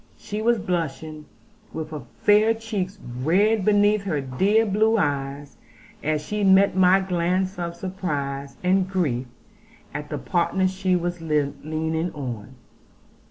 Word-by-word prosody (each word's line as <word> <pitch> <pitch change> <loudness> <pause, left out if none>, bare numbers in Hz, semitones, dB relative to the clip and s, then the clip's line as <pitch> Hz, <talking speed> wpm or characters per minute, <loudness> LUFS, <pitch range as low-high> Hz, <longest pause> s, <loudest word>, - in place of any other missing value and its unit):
She 210 +1 -5
was 235 +1 +3
blushing, 155 -5 -3 0.5
with 160 -1 -5
her 150 -2 -5 0.2
fair 215 +2 +5
cheeks 210 -4 -4 0.2
red 200 +8 +3
beneath 205 +1 +4
her 160 -7 0
dear 190 - +2
blue 220 +2 +2
eyes, 140 -4 -2 0.4
as 150 0 -1
she 210 0 -2
met 195 0 +5
my 190 0 +5
glance 185 +1 -1
of 170 -1 -3
surprise 145 -7 -4
and 185 +1 +2
grief 140 -10 -1 0.7
at 150 0 -5
the - - -3
partner 185 +1 +1
she 185 0 0
was 175 -1 -2
leaning 160 +2 -1
on. 130 -3 -6
180 Hz, 130 wpm, -24 LUFS, 150-195 Hz, 0.7 s, fair